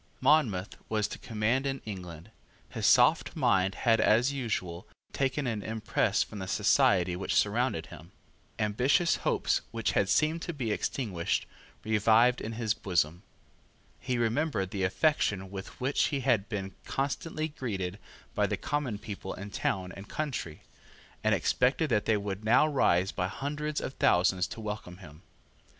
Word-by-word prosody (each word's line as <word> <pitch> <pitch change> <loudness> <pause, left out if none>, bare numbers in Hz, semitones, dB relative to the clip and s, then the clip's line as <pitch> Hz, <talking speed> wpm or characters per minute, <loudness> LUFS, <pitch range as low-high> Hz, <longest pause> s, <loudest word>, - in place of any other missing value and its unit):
Monmouth 130 -10 +2
was 110 -1 +1
to - - -8
command 115 +5 0
in 135 0 -2
England. 90 -2 -8 0.4
His - - -1
soft - - +4
mind 95 0 +2
had 115 -2 +4
as 120 +6 +3
usual, 95 -10 -3 0.3
taken 135 +1 0
an 115 -4 -2
impress 105 -1 0
from 105 - -9
the 95 - -5
society 90 -1 +3
which 95 - -2
surrounded 105 -5 +1
him. - - -13 0.5
Ambitious 125 +11 +2
hopes, - - 0
which 115 -2 -1
had 100 - +1
seemed 155 +2 +2
to 175 - -4
be 125 -7 -2
extinguished, 100 -6 -1 0.4
revived 110 +3 +4
in 115 - -4
his 110 -2 0
bosom. 90 -5 -1 0.8
He 125 -1 -2
remembered 115 - 0
the 95 -3 -1
affection 95 - +1
with 95 -1 -8
which 135 +3 +1
he 140 -2 -1
had 115 -6 +1
been 95 -3 -4
constantly 155 +3 -2
greeted 100 - -4 0.3
by - - +1
the - - -2
common 140 -7 -2
people 100 -3 -7
in 100 +2 -8
town 95 -2 -2
and 95 +2 -11
country, 130 - -4 0.6
and - - +3
expected 135 +4 +1
that 105 -2 +2
they 110 - +3
would 100 0 -4
now 120 +7 +5
rise 95 - +2
by 90 -1 -2
hundreds 150 +8 -3
of - - -5
thousands 90 -2 +3
to 115 - -8
welcome 105 -4 -6
him. 80 -4 -13
110 Hz, 155 wpm, -29 LUFS, 95-130 Hz, 0.8 s, now